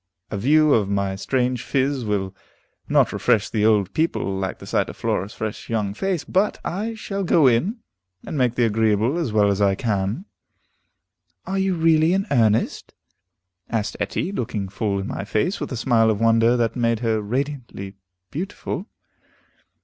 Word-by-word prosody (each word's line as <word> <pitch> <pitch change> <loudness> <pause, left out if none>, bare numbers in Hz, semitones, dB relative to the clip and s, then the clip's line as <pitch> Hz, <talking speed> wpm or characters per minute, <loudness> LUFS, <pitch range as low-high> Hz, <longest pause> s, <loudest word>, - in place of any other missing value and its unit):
A 105 - -2
view 150 +6 +4
of 105 -4 +2
my 100 -1 0
strange 125 +3 -1
phiz 135 -1 0
will 100 -2 -1 0.6
not - - +3
refresh 105 -2 +1
the 105 -2 0
old 105 -4 +2
people 155 -11 0
like 95 0 -3
the - - -11
sight - - 0
of - - -9
Flora's 100 +4 -2
fresh 110 -1 -5
young 105 -4 -1
face, 185 - -2
but 195 +3 0
I 215 +6 -3
shall 200 -2 -4
go 165 -4 +4
in, 170 - +2 0.4
and - - -5
make 125 -4 +1
the 120 - +3
agreeable 110 +6 +1
as 155 -9 -1
well 105 -1 +3
as 100 +1 -1
I 100 -1 +3
can." 105 - -2 1.2
"Are 195 +1 -2
you 190 -1 +1
really 160 0 +4
in 195 +1 +1
earnest?" 115 -4 +1 0.7
asked 110 -2 -2
Etty, 185 - -2
looking 110 - -3
full 100 +1 -1
in 95 - -3
my 95 - -4
face, 110 - -1
with - - -5
a 130 - -3
smile 115 -1 +3
of 105 -2 0
wonder 115 +1 +4
that 115 -1 0
made 115 -2 +1
her 110 -2 +1
radiantly 120 -4 -4 0.4
beautiful. 185 +4 -4
115 Hz, 170 wpm, -22 LUFS, 105-155 Hz, 1.2 s, view